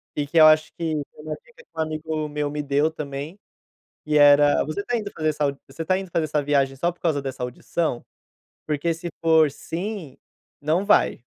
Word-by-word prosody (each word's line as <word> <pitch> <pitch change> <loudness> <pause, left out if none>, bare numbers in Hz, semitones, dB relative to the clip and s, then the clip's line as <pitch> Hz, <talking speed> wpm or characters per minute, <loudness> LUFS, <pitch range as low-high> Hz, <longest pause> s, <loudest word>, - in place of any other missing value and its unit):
E 145 - -1
que 165 +3 -2
eu 155 - +9
acho 155 0 +4
que, 165 -2 -3 0.2
uma 155 0 -5
dica 475 -1 -19
que - - -42
um - - -5
amigo 155 0 -3
meu 150 0 -2
me 150 +1 -3
deu 145 +2 +2
também, 150 +4 -6 0.7
que 150 0 0
era, 145 0 +6
você 155 +7 -3
tá 245 - -1
indo 210 -2 -4
fazer 155 -4 -2
essa 145 -2 -1
você 140 +5 -7
tá 185 +3 +1
indo 190 -2 -7
fazer 165 -2 0
essa 150 -1 0
viagem 140 -2 +1
só 170 +6 0
por 175 - -29
causa 155 -4 +1
dessa 130 -1 -5
audição? 125 +2 -2 0.6
Porque 155 +2 0
se 170 +2 -6
for 160 -2 +4
sim, 175 -1 -6 0.4
não 160 +6 +1
vai. 200 - +3
155 Hz, 200 wpm, -23 LUFS, 145-165 Hz, 0.7 s, eu